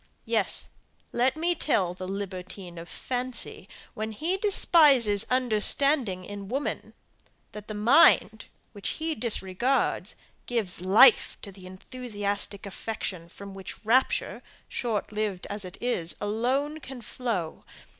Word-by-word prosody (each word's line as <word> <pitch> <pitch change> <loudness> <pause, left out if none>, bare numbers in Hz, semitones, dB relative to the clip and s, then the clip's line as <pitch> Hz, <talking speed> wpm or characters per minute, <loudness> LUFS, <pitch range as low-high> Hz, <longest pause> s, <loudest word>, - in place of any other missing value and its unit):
Yes, - - +1 0.4
let 255 +5 +1
me 345 +2 +1
tell 200 - 0
the 185 0 -7
libertine 185 -2 -6
of 170 - -10
fancy 250 -1 -3 0.2
when 220 +1 -5
he 325 - -1
despises 290 - +4
understanding 250 -3 +3
in 200 0 -8
woman 270 +7 -4 0.6
that 210 -1 -10
the 215 - -6
mind, 225 -1 +4 0.3
which 205 -3 -5
he 320 0 -2
disregards, 235 0 0 0.3
gives 215 -8 -2
life 215 +7 +5
to 200 - -8
the 185 -1 -13
enthusiastic 205 0 -4
affection 190 -4 -5
from 200 +2 -11
which 195 +3 -10
rapture, 250 +4 +1 0.3
short 220 -5 -3
lived 210 -3 -3
as 205 0 -4
it 180 -1 -9
is, 175 -10 0
alone 255 +9 -1
can 260 -4 -10
flow! 210 -9 -4
215 Hz, 125 wpm, -27 LUFS, 195-255 Hz, 0.6 s, life